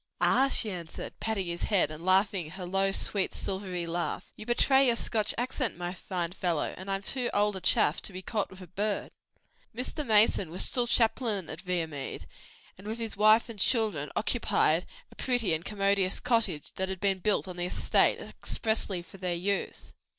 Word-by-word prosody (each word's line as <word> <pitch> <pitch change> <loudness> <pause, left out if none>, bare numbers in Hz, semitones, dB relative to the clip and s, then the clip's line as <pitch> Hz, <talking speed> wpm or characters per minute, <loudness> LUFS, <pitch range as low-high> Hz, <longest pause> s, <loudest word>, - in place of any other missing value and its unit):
"Ah," 270 +1 +4
she 220 -5 +1
answered, 170 -3 -7
patting 220 -4 -2
his 170 0 -5
head 200 -7 +2
and 155 +2 -9
laughing 190 -2 +2
her 180 +2 -7
low, 195 +2 +1
sweet 195 0 -1
silvery 190 -3 -3
laugh, 170 +1 -3
"you 215 - -10
betray 265 +3 +4
your 235 - +3
Scotch 215 -2 +2
accent, 250 -1 -1
my 175 0 -4
fine 180 -2 -4
follow; 175 -3 -1
and 190 +2 -8
I'm 195 0 -1
too 250 +2 +1
old 205 0 +2
a 190 - -5
chaff 155 - +3
to - - -4
be 185 0 -7
caught 210 +1 -2
with 190 0 -13
a - - -8
bird." 205 +4 -2 0.6
Mr. 260 +5 -3
Mason 215 - +4
was 175 +3 -2
still 245 -1 -1
chaplain 225 -5 +1
at 160 - -7
Viamede, 165 -7 -4 0.5
and 200 - -11
with 220 +2 -3
his 225 -2 -4
wife 215 +3 +5
and 230 -3 -8
children 220 0 +2
occupied - - +1 0.2
a - - -16
pretty 245 -8 +1
and 160 +1 -1
commodious 195 -1 +1
cottage 215 -11 +1
which 190 0 -1
had 190 -1 -4
been 195 0 +1
built 205 +1 +1
on 180 -1 -7
the 175 - -2
estate - - +2
expressly 215 -5 -2
for 195 - -14
their 180 -2 -2
use. 195 +3 -3
195 Hz, 185 wpm, -29 LUFS, 180-220 Hz, 0.6 s, wife